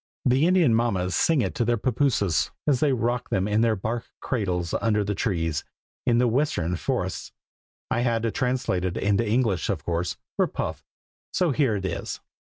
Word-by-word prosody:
The 130 Hz, +5 st, +4 dB
Indian 175 Hz, -10 st, +4 dB
mammas 95 Hz, -6 st, 0 dB
sing 155 Hz, -6 st, +3 dB
it -, -, -2 dB
to -, -, 0 dB
their 120 Hz, +1 st, +1 dB
pappooses, 115 Hz, -, +1 dB, 0.2 s
as 140 Hz, -4 st, +3 dB
they 145 Hz, 0 st, +3 dB
rock 120 Hz, -1 st, -1 dB
them 95 Hz, +1 st, +1 dB
in 105 Hz, +1 st, +2 dB
their 115 Hz, -1 st, +3 dB
bark 115 Hz, +4 st, -3 dB
cradles 90 Hz, -8 st, -2 dB
under 105 Hz, -2 st, +2 dB
the 100 Hz, +1 st, -1 dB
trees, 85 Hz, -, -1 dB, 0.4 s
in 120 Hz, -1 st, +4 dB
the 125 Hz, +1 st, +4 dB
western 115 Hz, -, 0 dB
forests. -, -, -3 dB, 0.6 s
I -, -, +1 dB
had 120 Hz, -2 st, +1 dB
to 115 Hz, -, +1 dB
translate 125 Hz, -8 st, 0 dB
it 90 Hz, -1 st, -2 dB
into 105 Hz, +2 st, +1 dB
English, 110 Hz, -6 st, +1 dB
of -, -, -1 dB
course, 85 Hz, 0 st, -2 dB, 0.2 s
for -, -, +3 dB
Puff; -, -, -4 dB, 0.5 s
so 180 Hz, -4 st, +2 dB
here 135 Hz, -5 st, +2 dB
it 95 Hz, -2 st, -3 dB
is. 95 Hz, -, -4 dB
115 Hz, 185 wpm, -25 LUFS, 95-125 Hz, 0.6 s, The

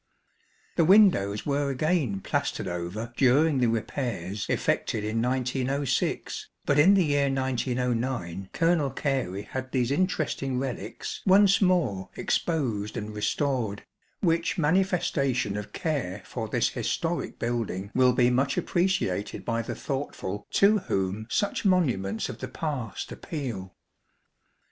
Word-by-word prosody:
The 170 Hz, -, +5 dB
windows 160 Hz, -, +5 dB
were 140 Hz, -1 st, 0 dB
again 135 Hz, -, 0 dB
plastered -, -, -2 dB
over 90 Hz, +7 st, -4 dB
during 140 Hz, +3 st, +4 dB
the 125 Hz, -, +3 dB
repairs 115 Hz, -4 st, -2 dB
effected 105 Hz, -, 0 dB
in 110 Hz, +2 st, -1 dB
1906, 130 Hz, +2 st, -1 dB, 0.2 s
but 145 Hz, 0 st, +3 dB
in 190 Hz, +7 st, +7 dB
the 190 Hz, -3 st, +4 dB
year 145 Hz, -1 st, +2 dB
1909 125 Hz, -7 st, -1 dB
Colonel 165 Hz, -4 st, +2 dB
Gary 130 Hz, -10 st, -2 dB
had 130 Hz, +2 st, -6 dB
these 125 Hz, -1 st, +1 dB
interesting 145 Hz, -6 st, 0 dB
relics 130 Hz, -1 st, -4 dB
once 195 Hz, +1 st, +6 dB
more 160 Hz, -, +1 dB
exposed 115 Hz, -11 st, -1 dB
and 105 Hz, 0 st, -5 dB
restored, 110 Hz, -1 st, -1 dB, 0.4 s
35 -, -, +3 dB
which 165 Hz, +2 st, +1 dB
manifestation 150 Hz, -, +1 dB
of 105 Hz, 0 st, -5 dB
care 105 Hz, -, -2 dB
for 115 Hz, -3 st, -4 dB
this -, -, +1 dB
historic -, -, -2 dB
building 110 Hz, -4 st, -2 dB
will 125 Hz, -1 st, +4 dB
be 125 Hz, 0 st, +3 dB
much 135 Hz, +2 st, +1 dB
appreciated 175 Hz, -, 0 dB
by 115 Hz, -1 st, 0 dB
the 115 Hz, -, -5 dB
thoughtful 135 Hz, -8 st, -4 dB
to 210 Hz, +2 st, +4 dB
whom 95 Hz, -, -2 dB
such 205 Hz, -, 0 dB
monuments 125 Hz, -, +1 dB
of 125 Hz, -3 st, -7 dB
the -, -, -4 dB
past 140 Hz, -9 st, -4 dB
appeal. 115 Hz, -, -5 dB
130 Hz, 125 wpm, -27 LUFS, 105-150 Hz, 0.4 s, in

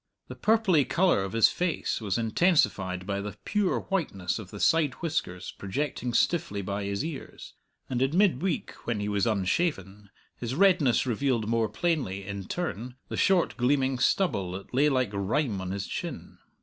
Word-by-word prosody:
The -, -, -7 dB
purply 215 Hz, -9 st, +3 dB
colour 170 Hz, -, +2 dB
of 95 Hz, -, -5 dB
his 115 Hz, -1 st, +5 dB
face 175 Hz, -8 st, -1 dB
was 100 Hz, -4 st, -1 dB
intensified 110 Hz, -, +1 dB
by 100 Hz, 0 st, -2 dB
the 105 Hz, 0 st, -6 dB
pure 210 Hz, -3 st, +1 dB
whiteness 105 Hz, -, -2 dB
of 100 Hz, -4 st, -9 dB
the 105 Hz, -, -9 dB
side 155 Hz, -1 st, +3 dB
whiskers 150 Hz, -, -3 dB
projecting 125 Hz, +4 st, -3 dB
stiffly 160 Hz, -, +1 dB
by 100 Hz, +1 st, -3 dB
his 100 Hz, +7 st, -2 dB
ears, 160 Hz, -5 st, -8 dB, 0.3 s
and 125 Hz, -1 st, -2 dB
in 135 Hz, +6 st, +1 dB
mid 190 Hz, -10 st, +3 dB
week, 185 Hz, -4 st, -1 dB, 0.2 s
when 115 Hz, -3 st, 0 dB
he 105 Hz, -, -2 dB
was 105 Hz, +2 st, +1 dB
unshaven, 100 Hz, -, -1 dB, 0.3 s
his 120 Hz, +1 st, -4 dB
redness 165 Hz, -10 st, +4 dB
revealed 120 Hz, -2 st, 0 dB
more 115 Hz, -1 st, +1 dB
plainly, 135 Hz, -, -1 dB
in 100 Hz, -1 st, -5 dB
turn, 125 Hz, -, -4 dB
the -, -, -3 dB
short 190 Hz, -3 st, +2 dB
gleaming 130 Hz, 0 st, +1 dB
stubble 100 Hz, -, +1 dB
that 95 Hz, +5 st, -8 dB
lay 145 Hz, +4 st, +4 dB
like 130 Hz, -6 st, +1 dB
rime 100 Hz, +2 st, 0 dB
on 95 Hz, -, -5 dB
his 100 Hz, 0 st, -3 dB
chin. -, -, -6 dB
120 Hz, 170 wpm, -28 LUFS, 100-160 Hz, 0.3 s, his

